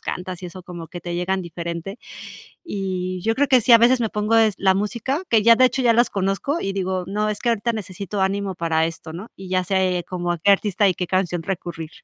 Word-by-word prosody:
cantas 180 Hz, 0 st, -5 dB
y -, -, -4 dB
eso 180 Hz, +1 st, -10 dB
como 175 Hz, -2 st, -9 dB
que 175 Hz, -, -8 dB
te 175 Hz, +1 st, -5 dB
llegan 185 Hz, +2 st, -1 dB
diferente. 170 Hz, +4 st, -6 dB, 0.7 s
Y 185 Hz, -, -3 dB
yo 225 Hz, +3 st, +1 dB
creo 285 Hz, +3 st, +1 dB
que 255 Hz, -2 st, +5 dB
sí, 245 Hz, -, +4 dB
a 230 Hz, -, +10 dB
veces 240 Hz, +2 st, +4 dB
me 225 Hz, -, +1 dB
pongo, 210 Hz, +2 st, 0 dB
es 220 Hz, -2 st, +4 dB
la 190 Hz, -1 st, +3 dB
música, 235 Hz, -, -2 dB
que 225 Hz, -2 st, +4 dB
ya 230 Hz, +1 st, +7 dB
de 255 Hz, -, +5 dB
hecho 260 Hz, +1 st, -1 dB
ya 240 Hz, -2 st, +5 dB
las 240 Hz, +2 st, +4 dB
conozco 195 Hz, -, -1 dB
y 195 Hz, -, -2 dB
digo: 185 Hz, -1 st, -2 dB
"No, 210 Hz, +3 st, -1 dB
es 210 Hz, -, -4 dB
que 240 Hz, -, +1 dB
ahorita 230 Hz, +1 st, 0 dB
necesito 200 Hz, -1 st, -5 dB
ánimo 195 Hz, 0 st, -1 dB
para 165 Hz, -2 st, +1 dB
esto", 160 Hz, -1 st, -8 dB
¿no?, 190 Hz, +7 st, -8 dB
y 190 Hz, -1 st, -10 dB
ya 185 Hz, 0 st, +2 dB
sé 185 Hz, -2 st, 0 dB
como 175 Hz, -1 st, -2 dB
a 175 Hz, -, -4 dB
qué 200 Hz, +5 st, +4 dB
artista 200 Hz, 0 st, +2 dB
y 185 Hz, -, +1 dB
qué 180 Hz, -, -3 dB
canción 175 Hz, -2 st, -1 dB
recurrir. 165 Hz, -3 st, -5 dB
190 Hz, 245 wpm, -22 LUFS, 180-215 Hz, 0.7 s, a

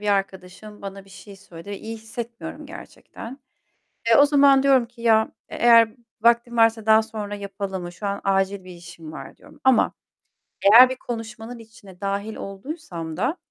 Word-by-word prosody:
bir 210 Hz, -, -4 dB
arkadaşım 195 Hz, +1 st, -3 dB
bana 195 Hz, 0 st, -8 dB
bir 195 Hz, -, -20 dB
şey 200 Hz, +1 st, -13 dB
söyledi 180 Hz, 0 st, -12 dB
ve 200 Hz, -, -5 dB
iyi 225 Hz, +1 st, -7 dB
hissetmiyorum 230 Hz, +1 st, -8 dB
gerçekten. 255 Hz, +5 st, -11 dB, 0.7 s
Eee, 225 Hz, -, +6 dB
o 285 Hz, -, +7 dB
zaman 280 Hz, -2 st, +5 dB
diyorum 265 Hz, -3 st, +4 dB
ki 235 Hz, 0 st, -17 dB
"Ya 220 Hz, -1 st, +3 dB, 0.2 s
e -, -, -8 dB
eğer 230 Hz, -2 st, +5 dB, 0.3 s
vaktim 235 Hz, 0 st, +2 dB
varsa 225 Hz, -1 st, +3 dB
daha 220 Hz, 0 st, +5 dB
sonra 210 Hz, -2 st, -6 dB
yapalım 195 Hz, -2 st, -5 dB
mı? 175 Hz, -, -7 dB
Şu 200 Hz, +4 st, -6 dB
an 200 Hz, 0 st, -3 dB
acil 195 Hz, 0 st, 0 dB
bir 185 Hz, -, -11 dB
işim 170 Hz, -2 st, -11 dB
var." -, -, -10 dB
diyorum -, -, -18 dB
ama 260 Hz, -2 st, +3 dB, 0.7 s
eğer 230 Hz, +6 st, +8 dB
bir 260 Hz, -, -3 dB
konuşmanın 235 Hz, 0 st, -7 dB
içine 200 Hz, -4 st, -16 dB
dâhil 200 Hz, +2 st, -3 dB
olduysam 195 Hz, -, -7 dB
da, 255 Hz, -, -1 dB
220 Hz, 175 wpm, -23 LUFS, 195-235 Hz, 0.7 s, eğer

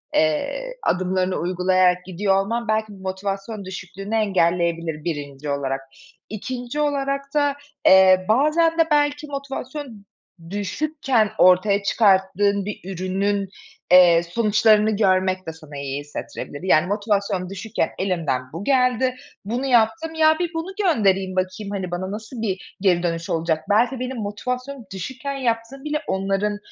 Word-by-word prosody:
eee, -, -, 0 dB
adımlarını 185 Hz, 0 st, 0 dB
uygulayarak 180 Hz, 0 st, +2 dB
gidiyor 190 Hz, +2 st, 0 dB
olman 230 Hz, +3 st, -3 dB
belki 215 Hz, 0 st, 0 dB
motivasyon 195 Hz, +2 st, -5 dB
düşüklüğünü 190 Hz, +3 st, -6 dB
engelleyebilir 170 Hz, -6 st, 0 dB
1'nci 145 Hz, -3 st, -5 dB
olarak. 135 Hz, -1 st, -2 dB, 0.5 s
2'nci 245 Hz, +5 st, -5 dB
olarak 275 Hz, -2 st, 0 dB
da, 290 Hz, -1 st, +2 dB, 0.3 s
eee, 185 Hz, -1 st, +7 dB
bazen 305 Hz, +7 st, +3 dB
de, -, -, +7 dB
belki, 290 Hz, 0 st, +2 dB
motivasyon 275 Hz, -5 st, -6 dB, 0.4 s
düşükken 225 Hz, -, 0 dB
ortaya 195 Hz, +3 st, +4 dB
çıkarttığın 200 Hz, -1 st, +2 dB
bir 210 Hz, -, -5 dB
ürünün, 195 Hz, +2 st, -1 dB, 0.4 s
eee, 175 Hz, -2 st, +7 dB
sonuçlarını 215 Hz, +3 st, +3 dB
görmek 185 Hz, -2 st, +1 dB
de 160 Hz, -, -4 dB
sana 155 Hz, -3 st, -11 dB
iyi 140 Hz, 0 st, -3 dB
hissettirebilir. 145 Hz, +1 st, -7 dB
Yani, 180 Hz, -2 st, +3 dB
"Motivasyon 200 Hz, -3 st, -1 dB
düşükken 200 Hz, +2 st, -2 dB
elimden 170 Hz, -9 st, 0 dB
bu 165 Hz, +4 st, -5 dB
geldi, 255 Hz, 0 st, +2 dB, 0.3 s
bunu 240 Hz, +6 st, -2 dB
yaptım. 270 Hz, +7 st, +2 dB
Ya, 315 Hz, 0 st, +4 dB
bir 350 Hz, -2 st, -1 dB
bunu 325 Hz, +4 st, -4 dB
göndereyim, 195 Hz, -, +2 dB
bakayım. 185 Hz, +2 st, -2 dB
Hani, 190 Hz, -3 st, -4 dB
bana 185 Hz, +2 st, -3 dB
nasıl 220 Hz, +3 st, -7 dB
bir 195 Hz, -4 st, -4 dB
geri 180 Hz, -3 st, +3 dB
dönüş 165 Hz, -1 st, -2 dB
olacak? 160 Hz, -1 st, 0 dB
Belki 240 Hz, +5 st, +2 dB
benim 255 Hz, 0 st, -4 dB
motivasyonum 250 Hz, +5 st, -4 dB
düşükken 260 Hz, +9 st, -5 dB
yaptığım 245 Hz, +1 st, -2 dB
bile 300 Hz, 0 st, -2 dB
onların 195 Hz, +2 st, -1 dB
200 Hz, 130 wpm, -22 LUFS, 185-250 Hz, 0.5 s, eee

